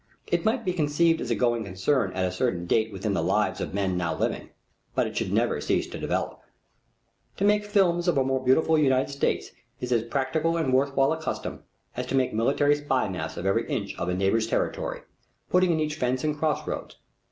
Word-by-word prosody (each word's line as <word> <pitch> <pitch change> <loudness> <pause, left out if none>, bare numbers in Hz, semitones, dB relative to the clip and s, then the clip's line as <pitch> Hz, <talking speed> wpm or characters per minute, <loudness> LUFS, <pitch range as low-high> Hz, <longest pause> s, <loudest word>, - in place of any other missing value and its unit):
It - - 0
might 230 +1 0
be 180 - 0
conceived 165 0 +2
as - - -4
a 120 - +2
going 120 -2 +1
concern 100 +3 0
at 95 0 0
a 90 - -1
certain 90 -3 -1
date 110 +5 +1
within 100 +1 -2
the 90 - 0
lives 95 +2 +1
of - - -4
men 95 -2 0
now 85 -2 -1
living, - - -2 0.5
but - - +2
it - - -6
should - - -1
never - - +1
cease - - +1
to - - -7
develop. - - -2 1.0
To 200 - +1
make 210 0 +4
films 190 -4 +2
of 175 - +3
a 135 - +4
more 130 0 -1
beautiful 155 +5 +4
United 135 -1 +2
States 140 - -1 0.3
is 125 - -4
as 120 -2 +3
practical 145 +6 0
and 155 -6 0
worth 140 +1 +2
while 135 +2 +3
a 160 - -5
custom - - -4 0.3
as 125 +1 -3
to 135 - -1
make 130 -1 +1
military 140 +6 +3
spy 145 -5 0
maps 80 -4 -5
of 90 - -5
every 95 - +1
inch - - -3
of 85 - -2
a 90 - 0
neighbor's 100 +4 +1
territory, - - -2 0.5
putting 180 0 +4
in 160 - +1
each 155 -1 -1
fence 125 -2 0
and 150 -1 0
cross 155 0 -1
roads. - - -5
130 Hz, 220 wpm, -26 LUFS, 105-155 Hz, 1.0 s, make